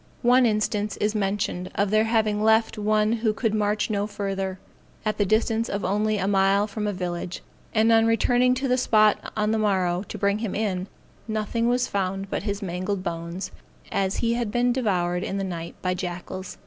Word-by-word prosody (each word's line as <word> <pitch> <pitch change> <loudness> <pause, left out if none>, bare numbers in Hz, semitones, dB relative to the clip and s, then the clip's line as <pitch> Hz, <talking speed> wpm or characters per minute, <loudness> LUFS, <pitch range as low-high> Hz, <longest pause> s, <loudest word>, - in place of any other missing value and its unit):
One 245 +1 +5
instance 210 -1 0
is 210 +1 0
mentioned 195 -3 -1
of 200 0 +1
their 215 +1 +4
having 220 -2 +1
left 220 +1 +3
one 215 0 +2
who 225 -2 +1
could 220 -1 -1
march 210 0 +1
no 205 0 0
further, 195 -2 -3 0.5
at 215 0 -1
the 205 - +2
distance 225 +2 +1
of 200 +1 -2
only 215 +1 +1
a 190 -1 -1
mile 195 +1 +3
from 210 0 -4
a - - +1
village; 180 -1 -4 0.3
and 225 +1 +3
on 225 0 +5
returning 245 +2 +3
to 265 +2 -1
the 250 0 +2
spot 215 -3 +4 0.2
on 210 0 +1
the 220 - +1
morrow, 185 -4 +1
to - - -6
bring 200 0 +1
him 220 -3 -3
in, 195 -3 -1 0.4
nothing 220 +2 -1
was 245 +1 +1
found 195 0 -2
but - - -1
his 200 0 -3
mangled 185 +1 -3
bones, 170 +1 -4 0.4
as 195 0 0
he 230 - +2
had 235 -2 -1
been 245 +2 +2
devoured 180 -8 0
in 195 - -3
the 195 - -1
night 170 -3 -5
by 185 -1 +1
jackals. 180 +1 -6
210 Hz, 195 wpm, -25 LUFS, 190-220 Hz, 0.5 s, One